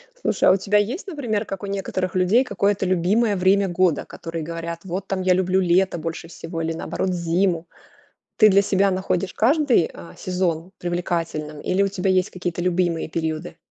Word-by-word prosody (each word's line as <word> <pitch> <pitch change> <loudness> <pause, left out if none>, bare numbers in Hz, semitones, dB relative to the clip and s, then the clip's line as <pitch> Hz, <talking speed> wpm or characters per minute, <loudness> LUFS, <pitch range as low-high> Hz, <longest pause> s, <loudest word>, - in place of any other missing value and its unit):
Слушай, - - +2
а - - +8
у - - +3
тебя 200 +2 +1
есть, 245 - -1
например, 235 - -2
как 195 0 -6
у - - -2
некоторых 190 -2 -3
людей, 190 +8 +4
какое-то 200 -5 0
любимое 195 +5 +2
время 195 +1 +3
года, 175 -3 +1
которые 165 -1 -6
говорят, 170 +1 -5
вот 190 +1 -5
там 190 -1 -2
я 185 0 +3
люблю 185 +1 +2
лето 185 +1 +2
больше 165 +1 -5
всего 165 0 -6
или 165 0 -1
наоборот 170 +3 -3
зиму? 170 0 0 0.7
Ты 215 - +7
для 200 0 +5
себя 195 0 +2
находишь 185 0 -1
каждый, 260 - +3
а, - - -11
сезон 180 -2 -2
привлекательным 165 -4 -3
или 190 +2 +1
у 200 - +2
тебя 190 -1 -1
есть 185 +1 +2
какие-то 175 -1 -4
любимые 175 -2 0
периоды? 160 +1 -3
185 Hz, 180 wpm, -22 LUFS, 170-195 Hz, 0.7 s, а